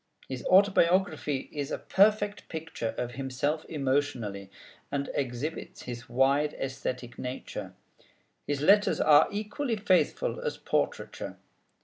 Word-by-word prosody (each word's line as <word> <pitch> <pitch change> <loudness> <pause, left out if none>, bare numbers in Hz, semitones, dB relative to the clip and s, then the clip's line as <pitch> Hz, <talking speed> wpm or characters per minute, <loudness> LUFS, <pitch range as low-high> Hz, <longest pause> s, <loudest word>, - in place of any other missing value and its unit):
His 130 -2 -5
Autobiography 180 -6 +3
is 145 -1 -3
a - - -2
perfect 205 +1 +2
picture 160 -8 -4
of 120 - -2
himself 135 +4 -2
emotionally, 130 -9 -1 0.4
and 140 0 -2
exhibits 140 +4 -4
his 120 0 -7
wide 140 +4 +2
æsthetic 130 -2 -4
nature. 105 -6 -6 0.7
His 145 -1 -1
Letters 205 +7 +5
are 150 -1 +6
equally 220 +5 -2
faithful 200 - +1
as 470 -1 -3
portraiture. - - -2
145 Hz, 110 wpm, -29 LUFS, 130-190 Hz, 0.7 s, are